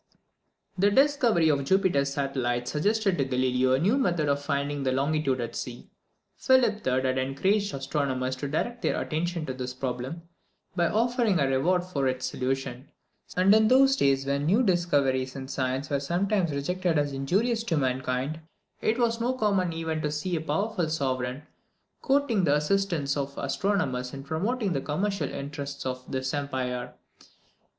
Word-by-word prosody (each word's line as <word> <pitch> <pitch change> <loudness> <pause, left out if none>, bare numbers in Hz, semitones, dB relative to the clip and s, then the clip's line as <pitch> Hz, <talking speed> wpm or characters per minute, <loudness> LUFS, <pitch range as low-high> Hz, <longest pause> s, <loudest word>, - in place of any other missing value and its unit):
The 200 +2 +5
discovery 245 - +3
of 140 -2 +2
Jupiter's 140 -4 +2
satellites 125 -3 -1
suggested 200 +3 +1
to - - +3
Galileo 130 0 +1
a 130 - +3
new 205 - +2
method 175 - +1
of 140 0 +1
finding 140 0 -2
the 130 -1 0
longitude 140 0 0
at 120 -1 -4
sea. 120 -1 -7 0.5
Philip 250 -5 +3
III. 130 0 +1
had 130 0 0
encouraged 190 +11 0
astronomers 135 -2 -1
to 140 - -4
direct 240 +12 -2
their - - 0
attention 170 +1 -2
to 130 - -4
this 125 0 -5
problem, 130 +5 -4 0.5
by 175 -2 +2
offering 230 -2 +1
a 140 - +3
reward 170 +8 +2
for 145 -7 -1
its 130 0 -1
solution; 130 0 -3 0.5
and 190 +2 +5
in 220 0 +5
those 270 +2 +5
days, 135 - +2
when 140 +1 -1
new 210 +9 +4
discoveries 140 - +1
in 135 -1 -6
science 130 +1 -2
were 140 - +1
sometimes 180 +5 0
rejected 170 +4 -1
as 145 -1 0
injurious 210 - 0
to 165 -7 0
mankind, 130 +2 -1 0.4
it 220 - +1
was 230 -1 +1
no 245 +2 +1
common 200 -7 +1
event 160 -1 -3
to 150 - -1
see 160 +4 -2
a 160 - -1
powerful 175 +2 -1
sovereign 130 -3 -2 0.6
courting 270 -7 +2
the 145 -3 +3
assistance 150 -3 0
of 140 -1 -4
astronomers 140 -6 -1
in 135 - -7
promoting 195 - -1
the 135 - -1
commercial 175 +1 -1
interests 140 0 -6
of 130 -1 -5
his 130 0 -2
empire. 130 -4 -3
145 Hz, 160 wpm, -27 LUFS, 135-195 Hz, 0.6 s, The